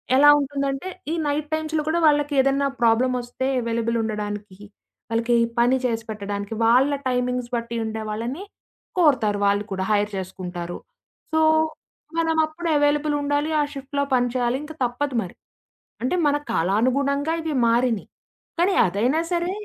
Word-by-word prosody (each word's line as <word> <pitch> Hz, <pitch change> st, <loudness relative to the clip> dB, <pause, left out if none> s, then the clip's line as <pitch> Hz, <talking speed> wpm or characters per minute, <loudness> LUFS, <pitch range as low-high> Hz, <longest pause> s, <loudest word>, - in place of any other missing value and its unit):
ఎలా 290 Hz, +2 st, +7 dB
ఉంటుందంటే 275 Hz, +3 st, -2 dB, 0.2 s
ఈ -, -, 0 dB
నైట్ 295 Hz, +1 st, -1 dB
టైమ్స్‌లో 315 Hz, 0 st, -1 dB
కూడా 335 Hz, +2 st, +1 dB
వాళ్ళకేదన్నా 280 Hz, -2 st, +2 dB
ప్రాబ్లమ్ 235 Hz, +2 st, +3 dB
ఒస్తే 245 Hz, +2 st, -5 dB
ఎవైలబుల్ 230 Hz, 0 st, -1 dB
ఉండడానికి, 210 Hz, -2 st, -4 dB, 0.5 s
వాళ్ళకి 230 Hz, +1 st, +1 dB, 0.2 s
పని 250 Hz, +2 st, +4 dB
చేసిపెట్టడానికి, 210 Hz, -3 st, -3 dB
వాళ్ళ 255 Hz, +5 st, +4 dB, 0.2 s
టైమింగ్స్ 250 Hz, -1 st, -1 dB
బట్టి 235 Hz, 0 st, -3 dB
ఉండేవాళ్ళని 220 Hz, -, -4 dB, 0.6 s
కోరుతారు 225 Hz, -11 st, +3 dB
వాళ్ళు 200 Hz, +1 st, +2 dB
కూడా. 190 Hz, 0 st, -2 dB
హైర్ 210 Hz, 0 st, +2 dB
చేసుకుంటారు. 180 Hz, -2 st, -6 dB, 0.6 s
సో, 315 Hz, -, +3 dB, 0.8 s
మనం 325 Hz, -1 st, +1 dB
అప్పుడు 335 Hz, +2 st, -6 dB
ఎవైలబుల్ 295 Hz, +1 st, +2 dB
ఉండాలి. 290 Hz, +2 st, 0 dB
ఆ -, -, +3 dB
షిఫ్ట్‌లో 280 Hz, +1 st, -3 dB
పని 245 Hz, 0 st, +2 dB
చేయాలి. 245 Hz, +1 st, +1 dB
ఇంక 315 Hz, +1 st, -8 dB
తప్పదు 250 Hz, +2 st, -2 dB
మరి. 180 Hz, -, -8 dB, 0.7 s
అంటే 260 Hz, +8 st, +1 dB
మన 290 Hz, -, +3 dB, 0.2 s
కాలానుగుణంగా 275 Hz, -, +1 dB
ఇవి 315 Hz, -3 st, -3 dB
మారినయి. 235 Hz, -2 st, +1 dB, 0.5 s
కానీ, 375 Hz, +2 st, +3 dB
అదైనా 240 Hz, -, +1 dB
సరే 345 Hz, +1 st, 0 dB
250 Hz, 130 wpm, -23 LUFS, 220-290 Hz, 0.8 s, ఎలా